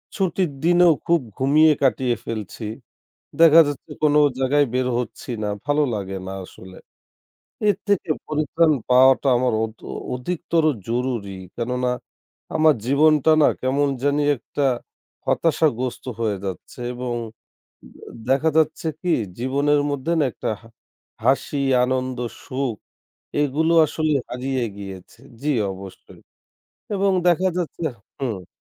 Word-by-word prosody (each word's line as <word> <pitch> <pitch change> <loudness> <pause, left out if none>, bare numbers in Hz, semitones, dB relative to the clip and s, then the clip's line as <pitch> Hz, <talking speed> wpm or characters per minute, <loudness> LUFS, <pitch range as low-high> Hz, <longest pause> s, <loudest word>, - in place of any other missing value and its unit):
ছুটির 185 -3 0
দিনেও 175 0 +5
খুব 170 0 +3 0.2
ঘুমিয়ে 150 +4 +5
কাটিয়ে 130 -2 +2
ফেলছি। 110 0 -5 0.8
দেখা 165 0 +9
যাচ্ছে 145 -2 -6
কোনো 150 0 +5 0.2
জায়গায় 145 +2 +3
বের 130 0 +1
হচ্ছি 125 0 -6
না 105 - -1 0.2
ভালো 145 +1 +2
লাগে 95 -1 -4
না 95 - -5
আসলে। 95 0 -14 0.9
এর 205 - +3
থেকে 200 -5 +1 0.2
পরিত্রাণ 155 +2 +2 0.2
পাওয়াটা 130 +2 +5
আমার 125 -1 +1
অধ 110 0 -6 0.4
অধিকতর 165 +4 -1 0.2
জরুরি। 120 -5 -2 0.2
কেননা 125 +1 -1 0.7
আমার 155 -1 +5
জীবনটা 150 +3 +4
না - - +6
কেমন 140 +2 +1
জানি 145 +1 +2
একটা 140 +3 -4 0.6
হতাশাগ্রস্ত 140 -6 0 0.2
হয়ে 110 -3 0
যাচ্ছে 95 +5 -7
এবং 125 0 -3 0.8
দে - - -18 0.3
দেখা 140 +5 +3
যাচ্ছে 160 +1 +1
কি 180 -2 0 0.3
জীবনের 140 +3 +2
মধ্যে 140 +3 -2
না 155 - +3
একটা - - -3
হা 115 - -16 0.6
হাসি 145 - +1 0.2
আনন্দ 130 0 -2 0.3
সুখ, 130 -2 -2 0.7
এগুলো 155 +4 +1
আসলে 155 +1 0
হারিয়ে 130 +1 -2
গিয়েছে। 95 -2 -10 0.2
জি 150 - -1 0.2
অবশ্যই 95 0 -12 0.7
এবং 195 0 +2 0.2
দেখা 180 +2 +3
যাচ্ছে 170 -1 -4 0.4
হুম 110 -10 -4
135 Hz, 120 wpm, -22 LUFS, 125-155 Hz, 0.9 s, দেখা